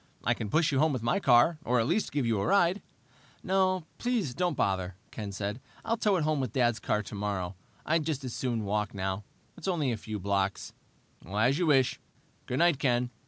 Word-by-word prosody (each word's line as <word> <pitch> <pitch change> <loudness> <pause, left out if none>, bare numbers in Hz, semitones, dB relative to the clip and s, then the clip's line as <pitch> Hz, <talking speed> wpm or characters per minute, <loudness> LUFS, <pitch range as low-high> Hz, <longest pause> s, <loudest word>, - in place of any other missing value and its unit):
"I - - +3
can 105 - -5
push 160 +7 +2
you 135 - +1
home 155 0 +3
with 125 -4 -3
my 180 +12 +2
car, 135 +2 +4
or 125 0 +2
at 115 - +2
least 210 - 0
give 140 -3 0
you 110 -4 +1
a - - -1
ride." 195 0 +3 0.6
"No, 185 -1 +2 0.2
please 230 - 0
don't 175 -3 -1
bother," 95 -2 0 0.2
Ken 105 -2 -5
said. 100 +4 -4 0.2
"I'll 230 - +1
tow 210 -3 +2
it 170 - +1
home 155 -1 +1
with 130 -5 -2
Dad's 120 -3 +2
car 105 - 0
tomorrow. 100 -3 -3 0.3
I'd 160 0 +2
just 145 -4 -2
as 125 -3 -5
soon 120 -4 -2
walk, 105 +1 -1
now. 95 +1 -2 0.3
It's 175 - -7
only 160 -8 +1
a 115 - -2
few 110 0 -5
blocks." 100 0 -1 0.5
"As 110 - +1
you 175 - +1
wish. 135 -4 +3 0.5
Good 125 - -2
night, 170 -3 +4
Ken." 125 -3 +1
125 Hz, 210 wpm, -29 LUFS, 105-165 Hz, 0.6 s, car